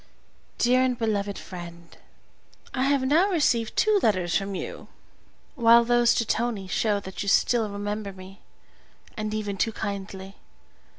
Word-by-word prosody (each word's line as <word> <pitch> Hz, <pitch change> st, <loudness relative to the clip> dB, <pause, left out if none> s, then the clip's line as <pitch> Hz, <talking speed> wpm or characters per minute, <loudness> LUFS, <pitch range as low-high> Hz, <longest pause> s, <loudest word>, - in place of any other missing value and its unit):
DEAR 250 Hz, +1 st, +3 dB
AND 255 Hz, -1 st, +1 dB
BELOVED 205 Hz, -3 st, -1 dB
FRIEND, 170 Hz, -2 st, -10 dB, 0.8 s
I 260 Hz, 0 st, 0 dB
have 280 Hz, -1 st, +2 dB
now 325 Hz, +9 st, +3 dB
received 245 Hz, -, +1 dB
two 430 Hz, -2 st, +3 dB
letters 185 Hz, -5 st, +1 dB
from 195 Hz, 0 st, -1 dB
you, -, -, -7 dB, 0.7 s
while 235 Hz, -3 st, +5 dB
those 240 Hz, 0 st, +3 dB
to 230 Hz, -, +1 dB
Tonie 225 Hz, -3 st, -1 dB
show 205 Hz, +2 st, 0 dB
that 190 Hz, -1 st, -8 dB
you 200 Hz, -, -1 dB
still 225 Hz, +1 st, +2 dB
remember 205 Hz, 0 st, -4 dB
me, 190 Hz, +1 st, -13 dB, 0.7 s
and 215 Hz, -1 st, -3 dB
even 210 Hz, -2 st, -3 dB
too 225 Hz, -, +1 dB
kindly. 195 Hz, -2 st, -6 dB
215 Hz, 140 wpm, -25 LUFS, 195-240 Hz, 0.8 s, while